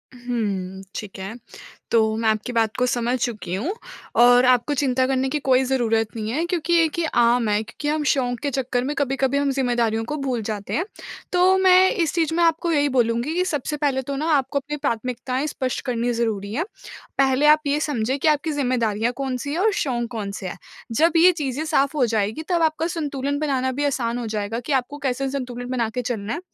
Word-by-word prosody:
हुँ। 205 Hz, -6 st, -3 dB
ठीक 205 Hz, -2 st, -6 dB
है। 190 Hz, +3 st, -5 dB, 0.6 s
तो 230 Hz, -, +5 dB, 0.2 s
मैं 225 Hz, 0 st, +1 dB
आपकी 220 Hz, +3 st, -1 dB
बात 225 Hz, -2 st, +1 dB
को 250 Hz, -, +2 dB
समझ 245 Hz, 0 st, 0 dB
चुकी 220 Hz, -7 st, -3 dB
हूँ। 275 Hz, -, -2 dB, 0.5 s
और 245 Hz, +1 st, +7 dB
आपको 250 Hz, +3 st, +3 dB
चिंता 260 Hz, -2 st, +1 dB
करने 265 Hz, 0 st, 0 dB
की 300 Hz, -, -1 dB
कोई 265 Hz, -2 st, +3 dB
ज़रूरत 235 Hz, -4 st, +1 dB
नहीं 215 Hz, -1 st, -3 dB
है 310 Hz, +7 st, 0 dB
क्योंकि 345 Hz, -1 st, -1 dB
ये 330 Hz, -1 st, +5 dB
कि 335 Hz, +2 st, -3 dB
आम 240 Hz, -4 st, +3 dB
है। 210 Hz, 0 st, +2 dB
क्योंकि 295 Hz, +6 st, -7 dB
हम 300 Hz, 0 st, 0 dB
शौक 245 Hz, -3 st, -1 dB
के 290 Hz, -, -2 dB
चक्कर 250 Hz, -2 st, -1 dB
में 290 Hz, +3 st, -2 dB
कभी-कभी 270 Hz, 0 st, 0 dB
हम 280 Hz, -1 st, +1 dB
ज़िम्मेदारियों 240 Hz, -4 st, 0 dB
को 300 Hz, +6 st, -3 dB
भूल 260 Hz, -5 st, -2 dB
जाते 205 Hz, -2 st, -4 dB
हैं। 335 Hz, -, +1 dB, 0.5 s
तो 365 Hz, +1 st, +5 dB
मैं 375 Hz, 0 st, +6 dB
इस 340 Hz, -10 st, 0 dB
चीज़ 325 Hz, -2 st, +1 dB
में 340 Hz, -, +3 dB
आपको 335 Hz, +1 st, +2 dB
यही 290 Hz, -2 st, +2 dB
बोलूँगी 240 Hz, +2 st, +1 dB
कि 360 Hz, +2 st, +1 dB
सबसे 300 Hz, -3 st, -2 dB
पहले 280 Hz, -3 st, 0 dB
तो 275 Hz, +2 st, -5 dB
ना 295 Hz, +3 st, -2 dB
आपको 280 Hz, +1 st, 0 dB
अपनी 295 Hz, +2 st, -5 dB
प्राथमिकताएँ 255 Hz, +2 st, -2 dB
स्पष्ट 260 Hz, -3 st, -3 dB
करनी 245 Hz, -1 st, 0 dB
ज़रूरी 215 Hz, -3 st, -2 dB
हैं। 320 Hz, +9 st, -1 dB, 0.5 s
पहले 270 Hz, +1 st, +3 dB
आप 305 Hz, 0 st, +6 dB
ये 285 Hz, +1 st, +1 dB
समझें 265 Hz, -4 st, -1 dB
कि 315 Hz, -, +1 dB
आपकी 305 Hz, +1 st, +2 dB
ज़िम्मेदारियाँ 240 Hz, -5 st, 0 dB
कौन-सी 270 Hz, 0 st, -3 dB
हैं 320 Hz, -, -2 dB
और 430 Hz, +3 st, +3 dB
शौक 245 Hz, -11 st, -1 dB
कौन-से 200 Hz, -4 st, -5 dB
हैं? 180 Hz, -, -6 dB, 0.3 s
जब 320 Hz, +9 st, +3 dB
ये 355 Hz, +3 st, +7 dB
चीज़ें 295 Hz, -4 st, -3 dB
साफ़ 290 Hz, -2 st, +1 dB
हो 260 Hz, -, +4 dB
जाएँगी 220 Hz, +3 st, -1 dB
तब 345 Hz, -2 st, +2 dB
आपका 320 Hz, +1 st, +1 dB
संतुलन 285 Hz, -4 st, -2 dB
बनाना 265 Hz, -4 st, 0 dB
भी 285 Hz, +3 st, -2 dB
आसान 245 Hz, -4 st, -1 dB
हो 245 Hz, -, -4 dB
जाएगा 215 Hz, +1 st, -3 dB
कि 245 Hz, +5 st, -6 dB
आपको 265 Hz, +2 st, -1 dB
कैसे 270 Hz, -1 st, -1 dB
संतुलन 250 Hz, -2 st, -5 dB
बना 240 Hz, -3 st, 0 dB
के 250 Hz, +3 st, -3 dB
चलना 225 Hz, -3 st, -3 dB
है। 330 Hz, -, -3 dB
260 Hz, 210 wpm, -23 LUFS, 235-295 Hz, 0.6 s, और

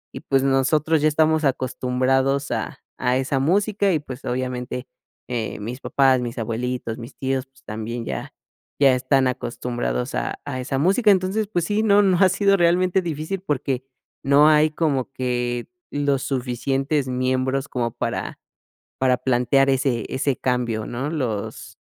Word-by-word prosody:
y -, -, -4 dB
pues, 135 Hz, -1 st, +1 dB
nosotros 145 Hz, +4 st, +2 dB
ya 155 Hz, -, +4 dB
estamos 160 Hz, +1 st, +2 dB
acostumbrados 130 Hz, +1 st, 0 dB
a -, -, -3 dB, 0.2 s
a 125 Hz, 0 st, +2 dB
esa 135 Hz, +1 st, 0 dB
música, 200 Hz, +6 st, +2 dB
y 160 Hz, -, +3 dB
pues, 135 Hz, -3 st, -9 dB
obviamente, 125 Hz, 0 st, -3 dB, 0.4 s
eh, 115 Hz, -4 st, -3 dB
mis 120 Hz, +6 st, -6 dB
papás, 130 Hz, -2 st, +3 dB
mis 120 Hz, 0 st, -5 dB
abuelitos, 115 Hz, +1 st, -3 dB
mis 115 Hz, -, -10 dB
tíos, 135 Hz, -1 st, -2 dB
pues, 135 Hz, 0 st, -26 dB
también 110 Hz, +2 st, -5 dB
ya -, -, -5 dB, 0.5 s
ya 135 Hz, -2 st, +6 dB
están 130 Hz, +1 st, +2 dB
acostumbrados 125 Hz, 0 st, -3 dB
a -, -, -2 dB
a 135 Hz, -3 st, -4 dB
esa 135 Hz, +1 st, -2 dB
música. 200 Hz, -, +3 dB
Entonces, 195 Hz, +3 st, +1 dB
pues 175 Hz, -5 st, -1 dB
sí, 210 Hz, +2 st, 0 dB
no 205 Hz, -1 st, +5 dB
no 190 Hz, -2 st, +3 dB
ha 190 Hz, -, +7 dB
sido 200 Hz, +1 st, +3 dB
realmente 180 Hz, +2 st, +3 dB
difícil 165 Hz, +3 st, -3 dB
porque 140 Hz, -6 st, -2 dB, 0.4 s
no 145 Hz, +3 st, +6 dB
hay 155 Hz, 0 st, +4 dB
como 140 Hz, -5 st, -1 dB
que 120 Hz, -1 st, -2 dB, 0.2 s
los 140 Hz, -2 st, 0 dB
suficientes 135 Hz, +2 st, -1 dB
miembros 130 Hz, +2 st, 0 dB
como 120 Hz, -2 st, -1 dB
para -, -, -4 dB, 0.6 s
para 130 Hz, -1 st, +3 dB
plantear 130 Hz, +2 st, +2 dB
ese 130 Hz, -4 st, +1 dB
ese 135 Hz, 0 st, 0 dB
cambio, 120 Hz, -4 st, -1 dB
¿no? 130 Hz, +5 st, -3 dB
Los 110 Hz, -6 st, -4 dB
135 Hz, 155 wpm, -22 LUFS, 125-150 Hz, 0.6 s, ha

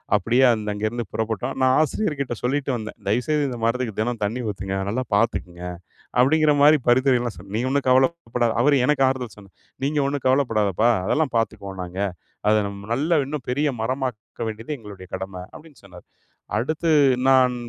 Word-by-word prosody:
அப்படியே 115 Hz, +6 st, +2 dB
அந்த 105 Hz, -2 st, -3 dB
அங்கேருந்து 110 Hz, +3 st, -3 dB
புறப்பட்டோம். 110 Hz, -2 st, -2 dB
நான் 130 Hz, 0 st, +4 dB
ஆசிரியர்கிட்ட 150 Hz, -, -1 dB
சொல்லிட்டு 135 Hz, +3 st, -1 dB
வந்தேன், 110 Hz, -2 st, -6 dB
"தயவுசெய்து 140 Hz, +8 st, +1 dB
இந்த 125 Hz, -, -5 dB
மரத்துக்கு 115 Hz, -2 st, -1 dB
தினம் 120 Hz, +1 st, -1 dB
தண்ணீ 110 Hz, +5 st, -1 dB
ஊத்துங்க, 95 Hz, -1 st, -5 dB
நல்லா 125 Hz, +5 st, -1 dB
பாத்துக்கங்க." 90 Hz, -5 st, -1 dB, 0.6 s
அப்படிங்கிற 150 Hz, +4 st, +4 dB
மாரி 150 Hz, +2 st, +7 dB
பரிந்துரைலாம் 125 Hz, -2 st, +3 dB
சொன்னேன். 100 Hz, 0 st, -11 dB
"நீ -, -, 0 dB
ஒண்ணும் 140 Hz, 0 st, 0 dB
கவலைப்படா" 130 Hz, -2 st, +2 dB
அவர் 145 Hz, +2 st, +4 dB
எனக்கு 145 Hz, -1 st, +3 dB
ஆறுதல் 130 Hz, -4 st, -3 dB
சொன்னார், 100 Hz, -2 st, -17 dB, 0.3 s
"நீங்க 145 Hz, +1 st, +1 dB
ஒண்ணும் 140 Hz, -1 st, -3 dB
கவலப்படாதப்பா, 115 Hz, -5 st, +2 dB, 0.2 s
அதெல்லாம் 150 Hz, +2 st, 0 dB
பாத்துக்குவோம் 100 Hz, -4 st, -3 dB
நாங்க. 90 Hz, +2 st, -6 dB, 0.5 s
அத 105 Hz, -, +5 dB
நம்ம 100 Hz, 0 st, -8 dB
நல்லா 155 Hz, +8 st, +1 dB
இன்னும் 140 Hz, -1 st, -5 dB
பெரிய 145 Hz, +4 st, +1 dB
மரமாக்க 125 Hz, -2 st, -4 dB
வேண்டியது 110 Hz, +6 st, -5 dB
எங்களுடைய 100 Hz, -4 st, -11 dB
கடம."அப்டின்னு 95 Hz, -, -9 dB
சொன்னார். 90 Hz, -2 st, -14 dB, 0.5 s
அடுத்து 155 Hz, +9 st, -1 dB, 0.4 s
நான் 130 Hz, -1 st, +5 dB
120 Hz, 155 wpm, -23 LUFS, 105-140 Hz, 0.6 s, மாரி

